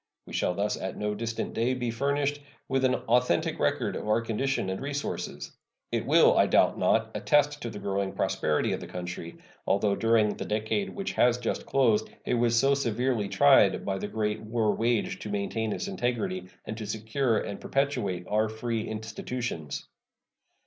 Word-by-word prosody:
We - - -11
shall 90 - 0
thus 100 +2 0
at 95 - -5
no 105 0 -1
distant 115 +2 -3
day 120 +3 +1
be 120 -2 -2
furnished 140 +4 0 0.3
with 135 -1 0
an 130 - +3
authentic 120 -6 +1
record - - 0
of - - -5
our 110 +2 +3
condition 115 0 -1
and 95 - -4
resources. 145 +1 -4 0.4
It - - -1
will, - - +6
I - - +5
doubt - - +3
not, - - +2
attest 145 0 +2
the 115 -4 -5
growing 100 -1 -2
prosperity 75 - 0
of - - -2
the - - -8
country, 90 -2 -6 0.3
although 100 0 +2
during 115 -2 +2
the - - -4
decade 110 - -1
which 195 -1 -4
has 120 0 +3
just 120 -2 -3
closed 115 -6 +2 0.2
it - - 0
was 120 -1 +2
so 135 +2 +4
severely 120 -4 0
tried 95 -7 +5
by 95 -1 -1
the 105 - -3
great 105 0 -2
war 110 -1 0
waged 115 -1 0
to 105 - -6
maintain 105 +2 -2
its 200 - -3
integrity 120 - -2 0.2
and 110 - -4
to 110 - -5
secure 110 +3 0
and 100 - -4
perpetuate 125 -11 -1
our 110 +1 +1
free 110 0 -3
institutions. 110 - -5
110 Hz, 175 wpm, -28 LUFS, 105-125 Hz, 0.4 s, will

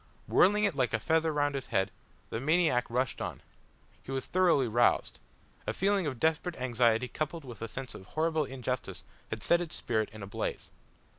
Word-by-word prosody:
Whirling 205 +3 +4
it 200 -4 +3
like 130 -5 +1
a - - 0
feather 160 +6 +2
round 145 -1 +1
his 135 -2 -4
head, 95 0 +1 0.4
the 115 - -2
maniac 155 -3 +2
rushed 125 +1 -1
on. - - -5 0.6
He - - -15
was 135 -1 -2
thoroughly 175 -8 +3
roused. 120 +2 +2 0.5
A - - 0
feeling 195 -3 +1
of 130 -5 -4
desperate 160 +2 +1
anxiety 120 -1 +2
coupled 155 +3 -4
with 120 -4 -9
a 115 - -3
sense 130 +2 -6
of 95 - -11
horrible 160 -1 0
injustice 130 -1 -4 0.3
had 110 - -5
set 170 - +4
his 175 -3 -4
spirit 110 -3 -1
in 110 -1 -9
a - - -4
blaze. 100 - -4
135 Hz, 190 wpm, -30 LUFS, 120-160 Hz, 0.6 s, Whirling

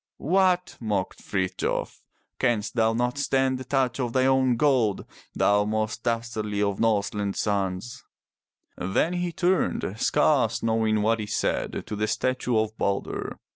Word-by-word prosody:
"What!" 180 +2 +1
mocked 105 -5 -2
Frithjof. 95 -2 -2 0.4
"Canst 110 -3 0
thou 115 -1 +3
not 125 +3 -1
stand 135 -2 +1
the - - -5
touch 130 -1 0
of 120 -3 -2
thine 130 0 +3
own 130 -2 +3
gold, 125 -8 +2 0.3
thou 105 0 +3
most 110 +1 -2
dastardly 115 -3 -2
of 100 -1 0
Norseland's 105 -2 0
sons?" 100 +2 -2 0.7
Then 95 - 0
he 175 -1 -1
turned, 175 - 0
scarce 140 -5 +2
knowing 110 -2 +1
what 115 +1 +2
he 105 - -4
said, - - -1
to 105 - -5
the 105 +1 -1
statue 125 +1 0
of 110 0 0
Balder. 100 0 -2
115 Hz, 140 wpm, -26 LUFS, 105-130 Hz, 0.7 s, thou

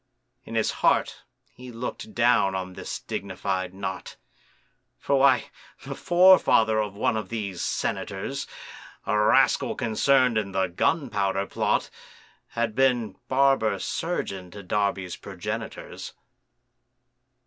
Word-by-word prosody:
In - - -7
his - - +1
heart - - +2 0.3
he 125 0 -10
looked 125 - -6
down 115 -5 +3
on 95 -1 -4
this - - -5
dignified 95 -1 -3
knot,— 95 0 -6 0.8
For 140 -1 +1
why, 135 -3 +4 0.3
the - - -5
forefather 175 -12 +5
of 105 -2 -2
one 110 - +1
of 110 -3 -4
these 100 -6 -4
senators, 105 +8 -3 0.6
A 105 - 0
rascal 105 0 +3
concern'd 125 +1 +2
in 100 -2 -5
the 95 0 +2
Gunpowder 100 - 0
Plot, - - -1 0.6
Had 115 -2 -2
been 120 -5 +1
barber 135 -4 +3
surgeon 100 - -3
to 100 +3 -10
Darby's 95 -1 -1
progenitors. - - -6
110 Hz, 115 wpm, -26 LUFS, 95-130 Hz, 0.8 s, forefather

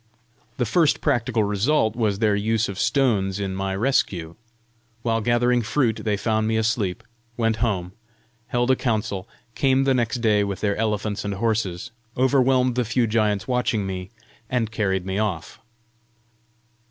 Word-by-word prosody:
The 125 - +1
first 155 - +2
practical 115 -2 +1
result 110 +3 +1
was 110 -4 0
their 105 -1 +2
use 110 +2 +1
of 100 -1 -6
stones 105 -9 +1
in 95 -1 -2
my 95 0 -2
rescue. 95 -8 0 0.7
While 115 -1 +1
gathering 120 +1 +2
fruit, 115 0 0
they 105 -2 0
found 110 0 0
me 110 0 +1
asleep, 110 -4 -1 0.3
went 115 -2 +1
home, 100 -6 -1 0.6
held 120 0 +1
a - - +4
council, 110 -6 -2 0.2
came 135 +1 +2
the 135 -1 +3
next 120 -1 0
day 105 -3 +2
with 100 -1 -3
their 100 -1 +1
elephants 105 -1 -1
and 100 -1 -3
horses, 105 -4 -1 0.3
overwhelmed 130 -1 +3
the 125 +1 0
few 120 +2 +1
giants 105 -2 0
watching 125 -5 0
me, 95 -1 -5 0.4
and 115 -3 -1
carried 95 -4 -1
me 95 +1 -2
off. 95 -7 -3
110 Hz, 155 wpm, -23 LUFS, 100-120 Hz, 0.7 s, a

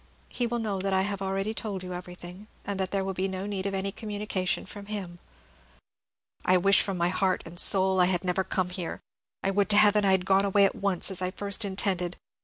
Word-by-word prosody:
He 245 - -2
will 240 +1 -2
know 210 -4 -2
that 195 0 -1
I 190 0 +2
have 200 -1 -4
already 195 +2 -2
told 205 -4 -5
you 180 0 -6
everything, 180 +2 -9 0.2
so 200 - -2
that 190 -1 -2
there 195 0 -1
will 190 0 -3
be 190 +1 -1
no 190 0 -5
need 200 -1 -3
of 195 - -3
any 195 +1 -2
communication 205 -3 -3
from 200 +1 -10
him." 190 -5 -6 1.2
"I 185 - +4
wish 195 +2 +5
from 195 -2 -1
my 175 0 +1
heart 185 0 0
and 170 +1 -7
soul 190 -1 +4
I 180 - +6
had 180 -1 0
never 185 +1 0
come 185 -1 -2
here. 180 -2 -5 0.4
I 195 - +1
would 200 +1 +1
to 205 - +4
Heaven 210 0 +5
I 195 -1 +4
had 185 -1 +1
gone 195 0 +3
away 200 0 +4
at 195 - +1
once, 195 -1 +2
as 185 - +3
I 185 - 0
first 200 +3 0
intended. 190 -3 0
195 Hz, 230 wpm, -27 LUFS, 185-200 Hz, 1.2 s, I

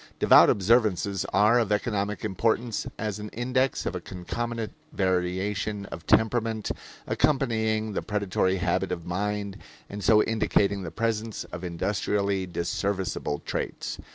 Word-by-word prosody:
Devout - - +7
observances 100 -2 +2
are 105 +4 +5
of 115 -3 0
economic 105 0 -1
importance 115 +2 0
as 105 -1 -3
an 105 0 -6
index 130 +3 0
of - - -2
a 90 - -4
concomitant 115 +6 -4 0.2
variation 95 +3 -1
of 80 - -8
temperament, 110 -1 +2 0.3
accompanying 110 -6 +1
the - - -1
predatory 100 -3 0
habit 90 +1 0
of 85 -2 -4
mind 100 +2 -2 0.3
and 100 0 -6
so 105 -2 +6
indicating 100 -2 +1
the 85 - -5
presence 110 +4 -2
of 90 - -8
industrially 100 +2 -1
disserviceable 90 -2 -2
traits. - - -4
105 Hz, 125 wpm, -27 LUFS, 95-110 Hz, 0.3 s, Devout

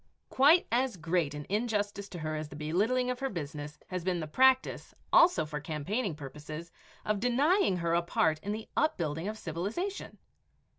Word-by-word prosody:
Quite 300 +7 +6
as 245 -2 +1
great 165 -2 0
an 145 0 -6
injustice 205 -2 -1
to 180 - -7
her 155 -1 -3
as 155 -1 -4
the 145 - -10
belittling 210 +12 +1
of 250 - -4
her 270 0 -1
business 150 - -6
has 185 -2 -3
been 180 -1 0
the 160 - -3
practice, 260 +10 +2 0.2
also 185 - +6
for 150 -1 -5
campaigning 165 - -2
purposes, 150 +3 -8 0.3
of 210 -1 0
denying 255 - +3
her 170 -1 0
a 170 - +3
part 160 -2 +1
in 205 - -4
the 220 +1 -5
upbuilding 165 - 0
of 215 +1 -4
civilization. 210 - -4
180 Hz, 170 wpm, -30 LUFS, 155-245 Hz, 0.3 s, Quite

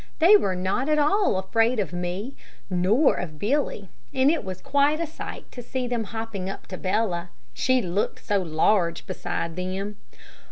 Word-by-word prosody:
They 350 +6 +7
were 195 - +2
not 190 +10 -1
at 305 - +3
all 340 - +3
afraid 225 +5 +2
of 190 -4 -2
me 180 +8 -3 0.4
nor 195 - +4
of 155 -4 -5
Billy, 210 - -1 0.2
and 265 +2 +4
it 320 -6 -1
was 185 -2 -6
quite 285 +6 +2
a 335 - 0
sight 315 - -8
to 245 - -7
see 255 +1 -3
them 240 -2 -1
hopping 220 -3 -5
up 195 - -7
to 185 - -5
Bella, 185 -3 0 0.2
She 255 -2 +2
looked 185 +3 -2
so 205 -1 +2
large 170 +1 +1
beside 165 -1 -3
them. 190 +3 -4
205 Hz, 170 wpm, -25 LUFS, 185-260 Hz, 0.4 s, They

